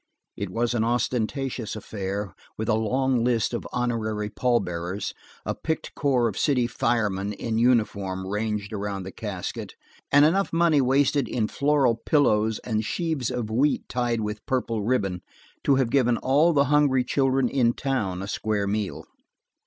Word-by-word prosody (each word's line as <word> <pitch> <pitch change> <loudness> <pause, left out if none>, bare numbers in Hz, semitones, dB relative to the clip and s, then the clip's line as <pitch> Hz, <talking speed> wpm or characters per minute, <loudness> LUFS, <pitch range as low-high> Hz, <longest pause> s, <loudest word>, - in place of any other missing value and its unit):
It 100 - -4
was 115 +5 0
an 115 -2 +1
ostentatious 120 0 -1
affair, 100 -2 -4 0.2
with 110 - -3
a 120 - +3
long 125 +3 +1
list 120 -1 +1
of 120 - -3
honorary 110 -3 -2
pallbearers, 95 -6 -1 0.3
a - - -1
picked 160 -1 -4
corps 130 -5 +2
of 105 - -4
city 130 -4 +2
firemen 105 -4 0
in 110 +2 -2
uniform 100 -6 +1
ranged 105 +1 -2
around 100 -2 -3
the 95 - -7
casket, 100 -4 -6 0.4
and 145 +1 +7
enough 190 +5 +2
money 165 -3 +3
wasted 135 +1 +2
in 110 -3 0
floral 140 -5 +2
pillows 110 -8 +2
and 110 -2 -1
sheaves 155 - -2
of 120 -4 -3
wheat 140 +6 +1
tied 120 -2 -1
with 105 0 -4
purple 120 -4 -1
ribbon, 100 -5 0 0.4
to 140 - +5
have 130 -3 +1
given 125 -3 +3
all 145 +6 +3
the 140 -3 +4
hungry 140 -3 +4
children 135 0 +1
in 120 -2 +2
town 100 -10 -2
a - - -5
square 105 -1 -1
meal. 100 0 -3
115 Hz, 155 wpm, -25 LUFS, 105-130 Hz, 0.4 s, and